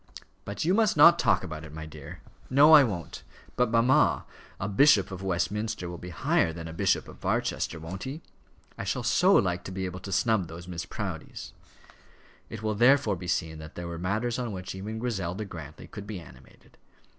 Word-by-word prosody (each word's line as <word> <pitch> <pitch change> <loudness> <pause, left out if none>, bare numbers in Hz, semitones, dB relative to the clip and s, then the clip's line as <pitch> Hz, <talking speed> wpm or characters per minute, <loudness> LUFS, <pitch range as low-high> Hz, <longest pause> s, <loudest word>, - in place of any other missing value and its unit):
"But 100 +8 -4
you 180 - +3
must 220 0 +2
not 170 0 +8
talk - - +2
about 80 -3 -6
it, 80 - -10
my 80 0 -7
dear." 75 -2 -10 0.3
"No, 145 +4 +7
I 150 -2 +10
won't. 95 - -4 0.3
But, 125 -1 +2
mamma, 115 +3 +3 0.3
a 100 - -2
Bishop 105 -1 +4
of 95 -1 -6
Westminster 95 +2 -2
will 85 -1 -7
be 90 - -8
higher 85 -1 +1
than 80 0 -7
a 80 - -7
Bishop - - +1
of - - -13
Barchester; 80 - -1
won't 85 +4 -7
he? 145 +5 -6 0.6
I - - -3
shall - - -2
so - - +4
like 90 -2 +2
to - - -6
be 95 0 -3
able 90 0 -5
to 100 - -8
snub 100 -1 +1
those 85 +2 -10
Miss 85 -2 -5
Proudies." - - -6 1.0
It 110 -1 -8
will 110 0 0
therefore 120 -1 +4
be 90 0 -8
seen 80 -2 -2
that 80 0 -11
there 85 0 -6
were 85 -1 -6
matters 110 +7 -1
on 120 -3 -3
which 90 -2 -6
even 105 +4 -6
Griselda 105 -4 -3
Grantly 80 -5 -9
could 100 -1 -9
be 105 -3 -5
animated. 65 -5 -17
95 Hz, 200 wpm, -28 LUFS, 85-115 Hz, 1.0 s, I